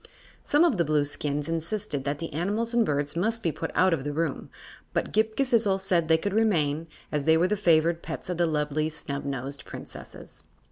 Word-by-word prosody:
Some 295 Hz, +3 st, +3 dB
of 330 Hz, -, +3 dB
the 170 Hz, -, +3 dB
Blueskins 145 Hz, -1 st, -1 dB
insisted 165 Hz, -2 st, -3 dB
that 140 Hz, 0 st, -1 dB
the 165 Hz, 0 st, -6 dB
animals 210 Hz, +9 st, -1 dB
and 235 Hz, -1 st, +4 dB
birds 145 Hz, -5 st, -1 dB
must 225 Hz, +6 st, 0 dB
be 165 Hz, -, +1 dB
put 165 Hz, -, -4 dB
out 185 Hz, -1 st, +4 dB
of 145 Hz, -5 st, -1 dB
the 145 Hz, -, -2 dB
room, 155 Hz, -1 st, -2 dB, 0.4 s
but -, -, -1 dB
Ghip 220 Hz, +1 st, +2 dB
Ghisizzle 230 Hz, -7 st, +2 dB
said 180 Hz, -4 st, +1 dB
they 160 Hz, 0 st, +5 dB
could 200 Hz, +4 st, -3 dB
remain, 165 Hz, -8 st, +1 dB, 0.2 s
as 150 Hz, -2 st, -1 dB
they 160 Hz, 0 st, +5 dB
were 175 Hz, +3 st, +3 dB
the 210 Hz, -, +1 dB
favored 170 Hz, -3 st, +3 dB
pets -, -, -6 dB
of 180 Hz, -2 st, -3 dB
the 175 Hz, -1 st, +2 dB
lovely 150 Hz, 0 st, 0 dB
Snubnosed 140 Hz, -3 st, -5 dB
Princesses. -, -, -10 dB
165 Hz, 195 wpm, -27 LUFS, 150-205 Hz, 0.4 s, they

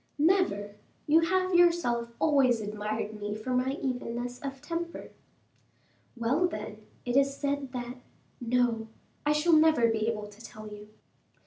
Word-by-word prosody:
"Never; 290 Hz, -, +2 dB, 0.3 s
you 310 Hz, +2 st, +5 dB
have 370 Hz, +3 st, +1 dB
yourself 335 Hz, -10 st, +3 dB
always 270 Hz, -6 st, +3 dB
admired 210 Hz, 0 st, -4 dB
me 205 Hz, 0 st, -3 dB
for 215 Hz, +4 st, -5 dB
my 255 Hz, +1 st, +1 dB
evenness 245 Hz, -1 st, -3 dB
of 275 Hz, -1 st, -5 dB
temper." 335 Hz, +3 st, -5 dB, 1.1 s
"Well, 265 Hz, +10 st, +2 dB
then, 215 Hz, -10 st, -7 dB, 0.2 s
it 245 Hz, 0 st, -1 dB
is 275 Hz, 0 st, +3 dB
said 280 Hz, -2 st, -2 dB
that 245 Hz, 0 st, -5 dB, 0.4 s
no, 240 Hz, -2 st, +1 dB, 0.4 s
I -, -, +5 dB
shall 315 Hz, +3 st, +3 dB
never 310 Hz, -7 st, +5 dB
be 220 Hz, -1 st, 0 dB
able 215 Hz, -2 st, -2 dB
to 210 Hz, +2 st, -14 dB
tell 215 Hz, -1 st, -10 dB
you." 210 Hz, 0 st, -10 dB
250 Hz, 140 wpm, -29 LUFS, 220-300 Hz, 1.1 s, you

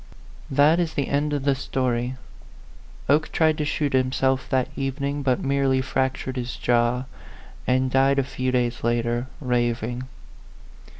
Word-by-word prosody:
That 145 Hz, +5 st, +4 dB
is 165 Hz, -3 st, -1 dB
the 140 Hz, -, -1 dB
end 145 Hz, +1 st, 0 dB
of 145 Hz, -2 st, -1 dB
the 140 Hz, 0 st, +3 dB
story, 130 Hz, -2 st, -1 dB, 0.9 s
Oke 150 Hz, +3 st, +2 dB
tried 155 Hz, -1 st, +2 dB
to 150 Hz, -, 0 dB
shoot 145 Hz, -1 st, -1 dB
himself 130 Hz, 0 st, +1 dB
that 130 Hz, -2 st, +1 dB
evening, 140 Hz, +1 st, -2 dB
but 130 Hz, -3 st, 0 dB
merely 135 Hz, -1 st, +2 dB
fractured 130 Hz, 0 st, -1 dB
his 125 Hz, 0 st, -3 dB
jaw, 120 Hz, +1 st, +1 dB, 0.6 s
and 130 Hz, 0 st, +2 dB
died 135 Hz, +1 st, +3 dB
a 135 Hz, -, +3 dB
few 130 Hz, -1 st, -2 dB
days 120 Hz, -1 st, 0 dB
later, 120 Hz, +1 st, 0 dB
raving. 120 Hz, -1 st, -1 dB
130 Hz, 140 wpm, -24 LUFS, 125-140 Hz, 0.9 s, That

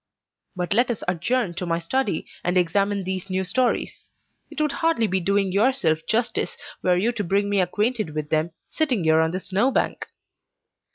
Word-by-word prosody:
But 180 Hz, +1 st, -1 dB
let 240 Hz, +4 st, +3 dB
us 235 Hz, -, -3 dB
adjourn 185 Hz, +4 st, 0 dB
to 180 Hz, +1 st, -4 dB
my 165 Hz, 0 st, +1 dB
study, 195 Hz, +3 st, -1 dB, 0.2 s
and 180 Hz, +1 st, +1 dB
examine 195 Hz, +3 st, +1 dB
these 190 Hz, +1 st, -4 dB
new 190 Hz, 0 st, 0 dB
stories. 250 Hz, +6 st, -1 dB, 0.4 s
It -, -, -7 dB
would 300 Hz, -1 st, +1 dB
hardly 325 Hz, -9 st, +1 dB
be 190 Hz, -2 st, +1 dB
doing 195 Hz, +1 st, +1 dB
yourself 200 Hz, -6 st, +2 dB
justice, 235 Hz, +2 st, 0 dB, 0.2 s
were 180 Hz, -1 st, +3 dB
you 220 Hz, +6 st, +2 dB
to 215 Hz, -3 st, -3 dB
bring 200 Hz, +3 st, 0 dB
me 200 Hz, -2 st, +3 dB
acquainted 210 Hz, -2 st, -1 dB
with 150 Hz, 0 st, -4 dB
them, 155 Hz, +2 st, +1 dB, 0.2 s
sitting 260 Hz, -, 0 dB
here 160 Hz, 0 st, +4 dB
on 160 Hz, 0 st, +3 dB
this 185 Hz, +3 st, -5 dB
snow 205 Hz, +7 st, +2 dB
bank!" 270 Hz, -, -1 dB
195 Hz, 180 wpm, -24 LUFS, 175-235 Hz, 0.4 s, here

